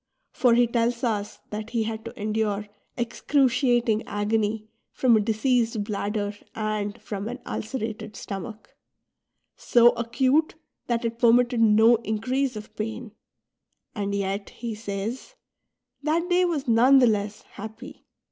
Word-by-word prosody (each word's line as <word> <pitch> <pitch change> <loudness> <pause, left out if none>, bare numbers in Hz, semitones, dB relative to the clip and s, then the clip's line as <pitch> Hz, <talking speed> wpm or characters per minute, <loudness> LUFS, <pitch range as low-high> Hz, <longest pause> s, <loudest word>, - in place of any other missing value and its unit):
For 245 -3 +3
he 240 0 +5
tells 235 +1 0
us 210 -3 -1
^ - - -33
that 215 +1 -5
he 230 -2 0
had 220 0 -4
to 230 - -9
endure 210 -1 -1 0.3
excruciating 240 -2 +2
agony 210 +1 -1 0.2
from 245 -3 +3
a - - +4
diseased 225 0 +1
bladder 205 0 -2 0.2
and 215 0 -2
from 210 -1 -5
an 245 +2 -5
ulcerated 220 -2 -5
stomach, 215 +2 -8 0.4
— - - -58 0.2
so 240 0 +5
acute 260 +7 +1 0.3
that 235 -1 0
it 230 0 -3
2:)ermitted 240 +1 +4
no 225 +1 +6
increase 240 +4 -1
of 215 0 -9
pain; 225 +1 -5 0.4
" - - -51
and 200 -2 -2
yet," 200 0 -2
he 235 -1 -6
says, 215 - -5 0.3
" - - -57
that 320 +4 0
day 360 +1 +4
was 310 -6 -2
none 245 +4 +6
the 260 - +6
less 210 -2 -1
happy." 220 +7 -11
225 Hz, 145 wpm, -25 LUFS, 210-245 Hz, 0.4 s, no